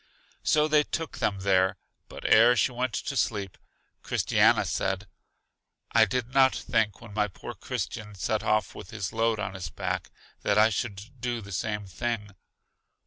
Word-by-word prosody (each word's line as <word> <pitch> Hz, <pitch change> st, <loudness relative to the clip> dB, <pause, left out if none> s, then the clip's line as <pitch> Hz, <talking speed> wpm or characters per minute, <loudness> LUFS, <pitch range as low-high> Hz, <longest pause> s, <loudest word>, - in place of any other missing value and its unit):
So 150 Hz, 0 st, +3 dB
they 155 Hz, -1 st, +5 dB
took 165 Hz, +1 st, -4 dB
them 100 Hz, -2 st, 0 dB
there, 95 Hz, 0 st, +3 dB, 0.3 s
but -, -, -10 dB
ere 115 Hz, +3 st, +7 dB
she 125 Hz, -, +2 dB
went 125 Hz, 0 st, -2 dB
to 140 Hz, -, -3 dB
sleep, 100 Hz, -7 st, -1 dB, 0.5 s
Christiana -, -, +3 dB
said, 95 Hz, +1 st, -1 dB, 0.9 s
I 115 Hz, -1 st, +6 dB
did 125 Hz, +3 st, -3 dB
not 135 Hz, -1 st, +5 dB
think 105 Hz, -3 st, 0 dB
when 115 Hz, -3 st, -11 dB
my 105 Hz, 0 st, +1 dB
poor 95 Hz, -, -8 dB
Christian 105 Hz, -1 st, -5 dB
set 105 Hz, +3 st, -1 dB
off 110 Hz, -1 st, +1 dB
with -, -, -10 dB
his 110 Hz, -5 st, -4 dB
load 115 Hz, 0 st, +1 dB
on 100 Hz, -2 st, -3 dB
his 95 Hz, -5 st, -5 dB
back -, -, -3 dB, 0.3 s
that -, -, +1 dB
I 110 Hz, +1 st, +6 dB
should 100 Hz, -2 st, -3 dB, 0.2 s
do 120 Hz, -1 st, -1 dB
the 100 Hz, -2 st, -10 dB
same 105 Hz, +2 st, -2 dB
thing. 105 Hz, +2 st, -3 dB
110 Hz, 165 wpm, -27 LUFS, 100-120 Hz, 0.9 s, ere